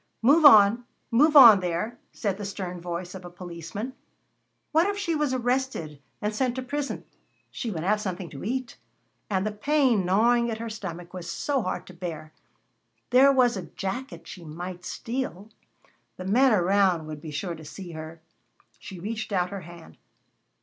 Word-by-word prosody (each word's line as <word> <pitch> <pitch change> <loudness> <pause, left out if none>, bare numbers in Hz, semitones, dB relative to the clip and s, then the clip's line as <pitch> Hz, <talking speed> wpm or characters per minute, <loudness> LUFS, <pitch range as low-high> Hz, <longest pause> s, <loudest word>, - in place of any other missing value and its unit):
"Move 295 +7 +5
on, 220 -2 +8 0.3
move 300 +7 +4
on, 235 -8 +10
there!" 185 +7 -3
said 200 -3 -3
the - - -5
stern 185 -3 -5
voice 175 +1 -5
of 190 -1 -9
a 175 - -8
policeman. 175 +6 -7 0.8
What 325 +4 +4
if 405 0 -2
she 390 -5 -1
was 300 -3 0
arrested 245 - -2 0.2
and 210 +1 0
sent 250 +2 0
to 260 - -4
prison? 285 +2 -4 0.5
She 235 - -4
would 165 -6 -4
have 210 +3 +1
something 185 -3 -4
to 135 - -9
eat. 255 - -3 0.5
And 190 -1 0
the 215 - -1
pain 250 -1 +2
gnawing 235 +6 +3
at 220 - -3
her 230 0 -5
stomach 175 -5 -7
was 175 -2 -7
so 270 - -1
hard 185 - -3
to 185 - -12
bear. 165 -3 -7 0.8
There 265 +3 +7
was 250 -3 +3
a 190 -3 -6
jacket 245 +7 -6
she 180 - -10
might 175 +3 -7
steal 230 -4 -4 0.7
the 185 - -7
men 250 +7 +4
around 190 -3 +3
would 155 -1 -8
be 155 - -8
sure 170 +4 -3
to 160 - -10
see 175 +3 -9
her. 160 0 -9 0.6
She 185 - -9
reached 215 +3 -5
out 180 -2 0
her 200 -1 -5
hand. 170 0 -13
200 Hz, 175 wpm, -26 LUFS, 175-245 Hz, 0.8 s, on